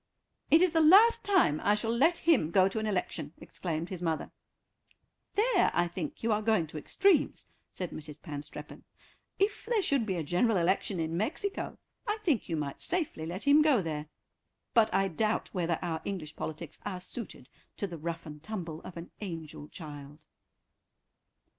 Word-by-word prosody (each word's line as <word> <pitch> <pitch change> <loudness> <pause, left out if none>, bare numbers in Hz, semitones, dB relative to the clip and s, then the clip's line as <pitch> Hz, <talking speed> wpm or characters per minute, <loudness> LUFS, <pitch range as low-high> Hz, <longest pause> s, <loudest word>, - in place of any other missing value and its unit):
"It 325 +3 +7
is 365 - +4
the 325 0 +3
last 400 +9 +7
time 365 - +3
I 205 +2 +4
shall 225 +2 -1
let 325 +8 +4
him 260 - +5
go 185 +2 +5
to 195 +3 -2
an 220 - -2
election," 175 -6 -2
exclaimed 165 -1 -4
his 185 -3 -5
mother. 160 -3 -2 1.0
"There 425 -2 +4
I 175 0 +3
think 230 - -6
you 230 - +2
are 210 0 +2
going 215 -6 +2
to 155 0 -6
extremes," 380 - +2 0.2
said 180 -2 -5
Mrs. 150 -1 -7
Panstreppon; 150 -3 -8 0.5
"if 405 +2 0
there 450 -4 +2
should 270 -9 +1
be 190 - 0
a 165 - -2
general 185 +8 +2
election 180 +2 +1
in 160 0 -1
Mexico 310 - -2 0.3
I 425 +1 0
think 295 - +1
you 165 - 0
might 145 -2 -4
safely 320 - -1
let 180 +4 -5
him 290 +2 +6
go 285 -10 +4
there, 155 -2 -4 0.7
but 225 -3 +5
I 195 - +2
doubt 210 +5 0
whether 170 -3 0
our 165 -2 -2
English 165 -6 -5
politics 160 0 -6
are 190 -3 -4
suited 185 - -8 0.3
to - - -1
the 170 -4 -7
rough 170 +1 -4
and 150 -1 -9
tumble 170 -5 -5
of 175 - -10
an 170 - -8
angel 165 -6 -6
child." 150 -2 -10
185 Hz, 175 wpm, -30 LUFS, 160-260 Hz, 1.0 s, It